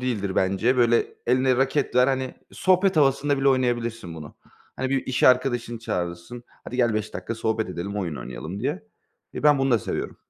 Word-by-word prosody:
değildir 105 -7 -2
bence. 100 +7 +2
Böyle 120 -1 +3 0.2
eline 130 +1 +3
raket 135 +2 0
ver, 125 +1 +6
hani, 130 -1 -1 0.2
sohbet 185 -1 +2
havasında 140 0 +2
bile 135 - +3
oynayabilirsin 120 -8 -1
bunu. 75 -2 -10 0.4
Hani, 130 0 -2
bir 135 -1 -1
iş 125 -1 -2
arkadaşını 120 -2 +3
çağırırsın, 90 +3 -5 0.2
"Hadi 125 - -6
gel, 120 -3 +2
5 110 0 -3
dakika 115 - -4
sohbet 110 -1 -1
edelim, 95 +3 -5
oyun 85 -7 -3
oynayalım." 80 +11 -7
diye. 145 +9 -2 0.5
Eee, - - -6
ben 150 -1 +5
bunu 135 0 +1
da 115 - +4
seviyorum. - - -4
120 Hz, 180 wpm, -24 LUFS, 105-135 Hz, 0.5 s, ver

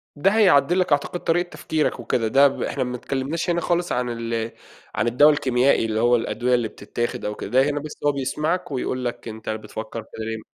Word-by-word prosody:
ده 180 +7 +3
هيعدِّل 180 -6 +4
لك 180 - 0
أعتقد 145 +5 +1
طريقة 175 +2 +1
تفكيرك 155 -6 -1
وكده، 115 -1 0
ده 135 +5 +6
ب 135 - -4
إحنا - - -1
ما 125 0 -4
اتكلمناش 135 +7 -3
هنا 170 0 +1
خالص 175 +1 0
عن 125 0 0
ال 115 -1 -3 0.4
عن 110 - 0
الدوا 145 +6 +6
الكيميائي، 130 -4 +2
اللي 110 -1 -1
هو 120 +1 +4
الأدوية 125 +1 0
اللي 120 -2 0
بتتاخد 120 +3 -4
أو 105 0 -2
كده، - - -6
ده 130 +3 +4
هنا 145 0 -1
بس 150 +1 -9
هو 145 - +5
بيسمعك 150 +6 -2
ويقول 130 -1 -2
لَك 120 - -4
أنتَ 110 -1 -7
بتفكر 110 +1 -5
كده 110 0 -8
ليه؟ 110 0 -4
130 Hz, 210 wpm, -23 LUFS, 115-150 Hz, 0.4 s, ده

